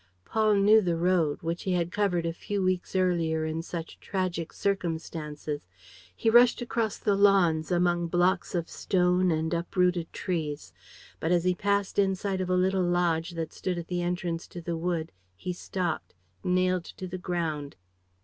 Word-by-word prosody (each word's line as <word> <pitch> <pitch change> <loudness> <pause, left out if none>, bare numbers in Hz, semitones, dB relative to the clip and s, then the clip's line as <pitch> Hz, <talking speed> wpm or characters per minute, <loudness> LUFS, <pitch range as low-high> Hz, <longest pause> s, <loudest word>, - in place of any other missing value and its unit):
Paul 215 -1 +2
knew 210 +2 +6
the 175 -4 0
road, 170 -4 +1
which 165 +1 -2
he 190 - -1
had 175 -1 0
covered 185 -5 +1
a 165 - -1
few 200 +3 -3
weeks 185 0 -1
earlier 165 -4 +1
in 160 +1 -2
such 165 -1 -7
tragic 180 -4 -2
circumstances. 160 - -3 0.5
He - - -3
rushed 240 +1 +6
across 230 -3 -1
the 205 - +1
lawns, 180 -6 +4
among 175 -1 +2
blocks 175 +2 +1
of 170 -1 -1
stone 180 0 +2
and 160 0 0
uprooted 175 0 0
trees. 150 - -3 0.5
But, 160 - -1
as 175 -1 +3
he 180 0 +3
passed 200 +2 0
in 195 -1 +3
sight 190 0 -2
of 185 - -3
a 185 - +3
little 190 +1 +2
lodge 175 -1 +1
that 165 -1 -3
stood 180 -2 -3
at 170 -1 -6
the 175 -1 -1
entrance 175 -1 -2
to 175 - -8
the 170 0 -3
wood, 165 -1 -2 0.2
he 180 - -4
stopped, 175 - -3 0.3
nailed 185 -1 +1
to 185 - -5
the 185 +1 -6
ground. 160 -5 -3
175 Hz, 170 wpm, -28 LUFS, 165-185 Hz, 0.5 s, knew